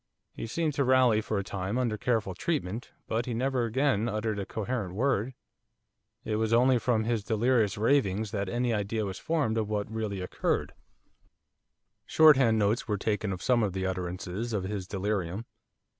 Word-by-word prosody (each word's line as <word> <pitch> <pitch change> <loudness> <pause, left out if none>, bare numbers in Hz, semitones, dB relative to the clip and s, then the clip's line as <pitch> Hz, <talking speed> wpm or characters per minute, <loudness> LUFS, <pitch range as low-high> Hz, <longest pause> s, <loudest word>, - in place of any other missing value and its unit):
He - - -6
seemed 155 +5 -1
to 140 - +1
rally 130 -4 +4
for 110 -1 -2
a 100 - -1
time 95 +3 -3
under 120 -4 0
careful 110 -4 0
treatment, 115 - -3 0.2
but 115 +2 -2
he 120 - -2
never 130 0 0
again 120 -2 +1
uttered 110 -1 -2
a 100 - -4
coherent 110 -4 -3
word. 130 0 0 0.9
It 110 -1 -1
was 110 0 0
only 125 +2 +4
from 115 -2 +1
his 115 -2 -1
delirious 110 0 +1
ravings 110 -3 +1
that 100 -3 -2
any 120 +1 0
idea 105 +1 -1
was 95 0 -5
formed 140 -9 0
of 105 -1 -2
what 105 -1 -2
had 110 - -8
really 105 -3 -2
occurred. 90 - -1 1.3
Shorthand 135 -8 +6
notes 105 +3 +1
were 105 -2 0
taken 105 0 -1
of 95 - -5
some 125 -2 +3
of 100 -4 0
the 95 0 -2
utterances 95 +4 -3
of 100 -3 -1
his 95 -1 -4
delirium. 95 +1 -2
110 Hz, 175 wpm, -29 LUFS, 100-120 Hz, 1.3 s, Shorthand